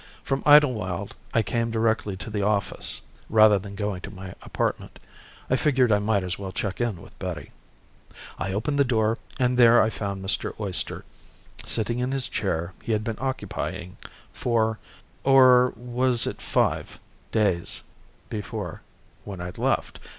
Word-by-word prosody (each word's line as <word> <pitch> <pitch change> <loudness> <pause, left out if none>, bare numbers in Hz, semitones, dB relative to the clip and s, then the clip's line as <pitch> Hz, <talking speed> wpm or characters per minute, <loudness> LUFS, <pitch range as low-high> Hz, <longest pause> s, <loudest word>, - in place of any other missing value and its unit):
From 135 0 -1
Idlewild, 110 -11 +4 0.2
I 115 - +2
came 115 0 -1
directly 110 -3 0
to 100 +3 -7
the 105 -1 -1
office 100 0 0 0.3
rather 110 -2 +6
than 100 +1 -9
going 105 -3 -3
to 95 - -7
my 95 -1 -9
apartment. - - -3 0.5
I 130 - +2
figured 130 -4 +3
I 105 - +4
might 105 -1 +1
as 90 +1 -3
well 95 -2 -5
check 100 +3 -3
in 110 -8 -2
with - - -16
Betty. - - -5 0.9
I 95 - -2
opened 130 +9 -1
the - - +7
door 115 -3 +1 0.2
and 125 -1 +1
there 120 0 +8
I 110 - +3
found 100 -3 -4
Mr. 110 +3 -1
Oyster 100 -4 -1 0.6
sitting 115 +2 +1
in 125 +1 0
the 135 0 -1
chair 85 -7 -2
he 115 - -1
had 105 0 0
been 110 -1 -3
occupying 130 -8 -4 0.4
four 110 -2 0 0.4
or 130 -2 +6
was 125 +1 +1
it - - -4
five - - 0 0.3
days 100 -6 0 0.4
before 105 -4 -5 0.4
when 100 -3 -7
I'd 90 0 -7
left. - - 0
110 Hz, 155 wpm, -25 LUFS, 100-125 Hz, 0.9 s, there